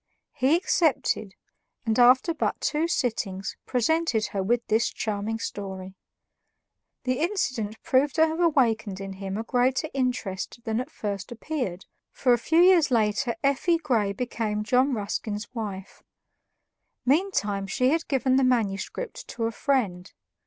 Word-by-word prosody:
He 280 +2 +3
accepted, 300 - +1 0.5
and 225 +1 +1
after 255 +7 +5
but 315 - -1
two 315 +2 0
sittings, 210 - -2
presented 250 -2 +1
her 195 - 0
with 235 +5 0
this 220 +2 +2
charming 215 +1 -3
story. 190 -4 -6 1.1
The 255 0 0
incident 255 - -1
proved 270 +2 +2
to 320 - +5
have 320 +1 -3
awakened 230 - +2
in 195 -1 -6
him 195 0 -5
a 220 - -2
greater 255 +5 +1
interest 240 -5 -2
than 225 0 -1
at 255 - -7
first 205 -5 -5
appeared, 240 - -4 0.3
for 250 -2 +2
a 240 - +2
few 325 +7 +3
years 355 -4 +6
later 225 0 +1
"Effie" 280 +5 +2
Grey 235 -11 0
became 215 -1 -2
John 255 +4 +2
Ruskin's 210 0 -3
wife. 200 -5 -6 1.0
Meantime 245 - +1
she 255 +5 +1
had 330 +3 0
given 260 -1 +2
the 270 - +3
manuscript 240 - -1
to 230 - -5
a 225 - 0
friend. 215 -10 -1
240 Hz, 140 wpm, -26 LUFS, 205-275 Hz, 1.1 s, years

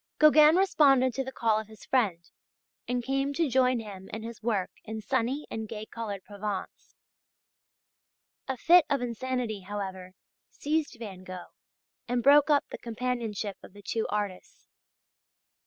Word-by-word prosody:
Gauguin 305 +1 +7
responded 275 -9 +4
to 270 - -2
the 265 - -6
call 225 -4 +1
of 220 - -7
his 220 -1 -14
friend 190 -10 0 0.6
and 245 0 -1
came 275 +2 0
to 330 0 +2
join 255 -1 +3
him 195 -4 -9
in 220 0 -6
his 230 -1 -8
work 215 -5 -1
in 220 0 -6
sunny 260 +5 -1
and 220 -1 -5
gay 215 -1 -6
coloured 210 -5 -6
Provence. 205 -1 -6 1.5
A 265 -1 -2
fit 345 +6 +6
of 275 -3 +1
insanity, 245 -2 -2
however, 190 -1 -6 0.4
seized 305 -1 -2
Van 200 -5 -8
Gogh 185 -1 -9 0.5
and 245 0 0
broke 285 +2 +6
up 290 -2 +4
the - - -6
companionship 230 -4 -3
of - - -14
the 205 0 -14
two 225 +2 -2
artists. 205 -3 -4
230 Hz, 150 wpm, -28 LUFS, 205-265 Hz, 1.5 s, Gauguin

